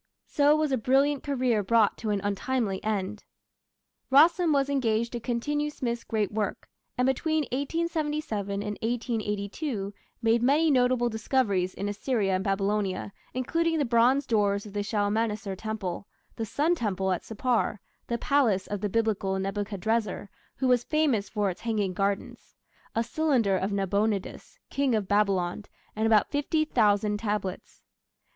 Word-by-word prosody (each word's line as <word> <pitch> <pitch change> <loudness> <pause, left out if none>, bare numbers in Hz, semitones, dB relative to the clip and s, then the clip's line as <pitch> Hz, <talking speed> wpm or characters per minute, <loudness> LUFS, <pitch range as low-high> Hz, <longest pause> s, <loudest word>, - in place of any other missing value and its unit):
So 290 +1 +3
was 310 -2 0
a 260 - +1
brilliant 275 +4 +2
career 255 -6 +1
brought 215 +1 +3
to 220 - -3
an 205 -1 0
untimely 205 0 -1
end. 210 -1 -2 0.9
Rassam 330 +4 +5
was 275 -2 +2
engaged 235 -5 0
to 240 - -4
continue 290 +6 -1
Smith's 235 -5 -3
great 215 -3 -1
work, 210 -2 -3 0.3
and 250 - +2
between 310 +4 +1
1877 295 - -2
and 210 -1 -5
1882 220 -1 -2 0.3
made 225 +1 +3
many 295 +6 +3
notable 250 -2 +3
discoveries 220 -5 0
in 200 - -3
Assyria 205 -1 0
and 185 +1 0
Babylonia, 195 0 -1 0.2
including 330 +6 0
the 290 - +1
bronze 245 +4 +3
doors 205 -4 +1
of 205 -1 -11
a 205 - 0
Shalmaneser 210 -1 -1
temple, 200 -2 -4 0.3
the 225 - -4
sun 305 - +1
temple 195 - -1
at 180 - -1
Sippar; 225 -1 -1 0.3
the 235 - -1
palace 235 -8 +2
of 205 -2 -4
the 210 - -1
Biblical 200 -3 0
Nebuchadrezzar, 205 +1 -2 0.3
which 265 - 0
was 250 -1 +3
famous 285 -10 +1
for 205 -3 0
its 175 - -11
"hanging 210 -5 -1
gardens"; 195 +1 -3 0.4
a 230 - +2
cylinder 240 -6 +1
of 190 +2 -1
Nabonidus, 200 +1 -1
King 275 -4 +1
of 210 -3 -1
Babylon; 200 -2 +1 0.3
and 220 +1 +1
about 215 -2 +3
fifty 310 +2 +1
thousand 210 -5 +2
tablets. 205 -4 -4
220 Hz, 145 wpm, -27 LUFS, 200-260 Hz, 0.9 s, Rassam